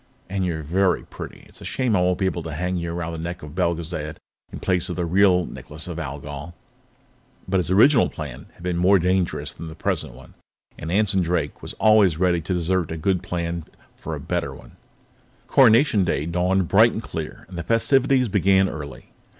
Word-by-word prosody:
"And 95 -1 -1
you're 85 -3 -2
very 90 +4 +1
pretty. - - -10
It's - - -14
a - - -9
shame 125 -5 0
I 90 - +3
won't 90 0 +2
be 95 - 0
able 90 -2 -1
to 80 -2 -6
hang 90 +4 -2
you 85 -1 -3
around 85 -1 -4
the 80 - -5
neck 85 +1 -5
of 75 - -9
Belgezad 85 -3 -2 0.4
in - - -7
place 90 -2 0
of 90 - -3
the 90 - -1
real 90 0 +4
Necklace 75 +2 -10
of 85 -1 -5
Algol." 75 +2 -7 0.9
But 95 +1 +1
his 90 -1 -1
original 115 +8 +5
plan 75 -6 -8
had - - -16
been 90 -1 -1
more 95 +3 +5
dangerous 90 0 0
than 85 - -8
the 80 - -9
present - - -2
one, 60 0 -15 0.5
and 80 - -5
Anson 100 0 +2
Drake 85 -4 -1
was - - -7
always 105 -7 +4
ready 90 -1 +2
to 90 - -3
desert 90 0 0
a 80 - -4
good 90 +2 0
plan 85 -1 -3 0.3
for - - -6
a - - -6
better - - -3
one. - - -14 0.7
Coronation 115 -4 +5
Day 75 -4 0
dawned 90 +2 +1
bright 110 +6 +5
and 110 - -4
clear, 80 -1 -6
and 90 - -11
the 85 - -3
festivities 130 - +2
began 95 -1 +3
early. 75 -5 -8
90 Hz, 200 wpm, -23 LUFS, 80-95 Hz, 0.9 s, original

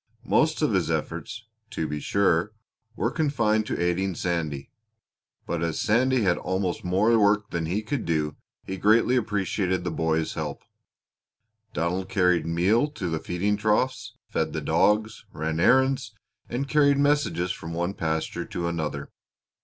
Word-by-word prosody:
Most - - +2
of - - +2
his - - +1
efforts, 110 0 -3 0.2
to 80 -9 -3
be 75 0 -3
sure, 100 +3 +1 0.4
were 115 - 0
confined 115 -9 +1
to - - -2
aiding 90 +2 0
Sandy; 80 -6 -3 0.7
but 85 -1 -2
as 85 -2 -1
Sandy 125 +2 +2
had 90 -3 +2
almost 95 -1 -2
more 105 +6 +3
work 105 0 +2
than 85 -2 -2
he 100 +6 -1
could 130 +2 -2
do 75 -3 -1 0.3
he 95 - -5
greatly 110 +6 +4
appreciated 100 -5 0
the 90 - -2
boy's 80 0 0
help. - - -5 1.1
Donald 90 +3 -1
carried 90 -4 +2
meal 95 - +2
to 100 - -4
the 80 -1 -1
feeding 100 +6 -1
troughs, 110 +3 0
fed - - -2
the - - -2
dogs, 105 +1 +1
ran 80 +1 -2
errands, 130 +2 +3 0.3
and 130 +4 -2
carried 145 -1 +4
messages 140 - +1
from 80 -1 -6
one 85 +3 -1
pasture 80 -3 -2
to 85 -1 -3
another. 75 -4 -3
95 Hz, 150 wpm, -26 LUFS, 85-110 Hz, 1.1 s, greatly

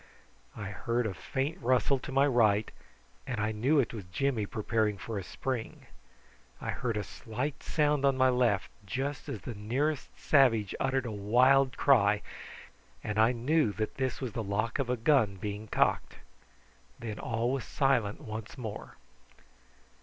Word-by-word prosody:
I 100 -2 -5
heard 115 +3 -1
a 105 - -2
faint 135 - -3
rustle 130 +2 +2
to 140 - -8
my 135 +1 +4
right, 110 -6 +3 0.6
and 125 -4 -3
I 105 +1 0
knew 130 +8 +2
it 125 - 0
was 110 -4 -6
Jimmy 110 +3 -1
preparing 110 -1 0
for 105 +2 -4
a - - -6
spring. 125 +4 -5 0.7
I - - -3
heard 115 -4 -2
a 105 - -1
slight 130 +9 -5
sound 150 -2 +1
on 135 -1 +3
my 130 0 +5
left 120 -6 +1
just 135 +8 -4
as 105 - -5
the 120 - -6
nearest 130 +8 -1
savage 115 -9 +3
uttered 135 -1 0
a 120 - -3
wild 125 +6 +3
cry, 105 -7 +4 0.8
and 105 0 -2
I 110 +2 +5
knew 125 0 +1
that 110 0 -3
this 130 -2 -1
was 130 -4 -4
the 120 - -2
lock 110 +5 -1
of 135 -3 -1
a 125 - +1
gun 115 -5 +3
being 105 +2 -5
cocked. - - +1 0.8
Then 115 -4 -6
all 120 +1 -1
was 135 -2 -1
silent 130 -4 +1
once 110 -1 -7
more. 110 -5 -7
120 Hz, 160 wpm, -30 LUFS, 105-135 Hz, 0.8 s, my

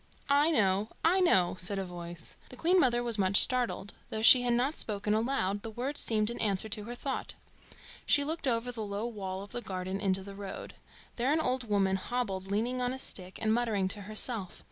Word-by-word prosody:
"I 290 +3 +4
know! 205 - +2 0.2
I 360 +4 +4
know!" 185 - +3
said 195 +2 -4
a 195 - -2
voice. 175 -2 -7
The - - -9
Queen 350 +8 +3
mother 240 -5 +2
was 235 -3 -1
much 195 +1 +5
startled; 245 -5 +3 0.2
though 220 0 -4
she 250 +2 +9
had 245 -1 +1
not 265 +6 0
spoken 210 -1 -2
aloud, 215 -4 0
the 225 - -6
words 255 +6 -3
seemed 215 0 +1
an 235 - -7
answer 205 -1 +1
to 210 -1 -3
her 240 +2 -6
thought. 265 +1 -4 0.7
She 285 - +5
looked 315 0 -2
over 240 0 0
the 230 -2 -6
low 205 +1 -4
wall 195 -4 -5
of 205 - -12
the 240 - -4
garden 185 -1 -4
into 190 -1 0
the 200 0 -9
road. 195 -1 -8 0.4
There 250 +3 +1
an 315 - +2
old 255 -5 -1
woman 195 -2 +2
hobbled, 195 -3 -3
leaning 235 +5 -1
on 250 0 0
a - - -5
stick, 185 -7 -3
and 220 0 +2
muttering 220 -5 0
to 205 - -5
herself. 215 -1 -1
220 Hz, 210 wpm, -30 LUFS, 195-250 Hz, 0.7 s, she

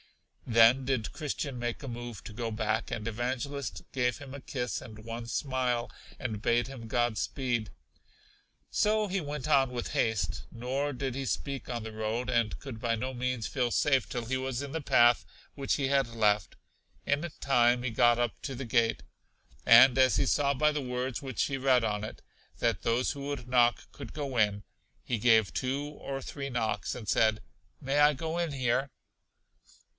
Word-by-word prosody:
Then 115 +3 +6
did 125 -4 -1
Christian 140 -3 -4
make 120 -1 -3
a - - -6
move 120 -3 -6
to - - -8
go 115 +1 -3
back, 110 0 -1
and 110 0 -3
Evangelist 120 - -3
gave 125 -2 +1
him 135 -2 -10
a 140 - -8
kiss 125 -3 -3
and 110 -1 -11
one 115 0 -6
smile, 125 -2 -1 0.3
and 110 -5 -4
bade 120 +2 +2
him 130 -4 -9
God 120 -1 +1
speed. 120 -5 -1 1.0
So 215 0 +2
he 195 0 -1
went 145 -2 -4
on 135 -3 +4
with 125 -1 -4
haste, 100 -9 -1
nor 130 +5 -2
did 130 -1 -3
he 135 0 -3
speak 135 +1 -3
on 120 -2 -3
the 110 0 -7
road; 110 +3 -2
and 115 -3 +1
could 125 -5 -8
by 115 -1 +1
no 130 +4 -3
means 125 -2 -2
feel 125 -3 0
safe 135 -2 +2
till 120 -2 -3
he 130 +3 -1
was 130 -1 -3
in 140 - -6
the 160 - -3
path 120 -3 +5 0.3
which 140 -2 0
he 140 -2 0
had 135 -2 +2
left. 105 -3 +1 0.5
In 145 +4 0
time, 120 -2 +3
he 130 - -1
got 120 +1 +4
up 120 -2 -1
to 135 - -4
the 130 +2 -5
gate. 115 -1 +1 0.6
And 120 +2 +8
as 130 -1 +5
he - - +2
saw 140 +1 +2
by 150 +3 +3
the 150 - -1
words 125 0 -3
which 135 -3 -2
he 135 - -1
read 130 -2 +3
on 105 -1 -1
it, 110 - -8 0.3
that - - 0
those 120 +2 +1
who 140 0 -6
would 140 -4 -4
knock 120 -1 +3
could - - -9
go 140 -4 -4
in, 105 -2 +2 0.4
he 120 -3 -2
gave 110 -2 +4
two 135 +2 -1
or 140 -2 -6
three 140 +1 -5
knocks, 110 -4 -2
and 115 -4 -8
said: 110 +1 +3 0.4
May 135 +2 0
I 150 +1 +6
go 160 +4 -3
in 170 -3 -1
here? 130 0 0
125 Hz, 190 wpm, -30 LUFS, 115-135 Hz, 1.0 s, And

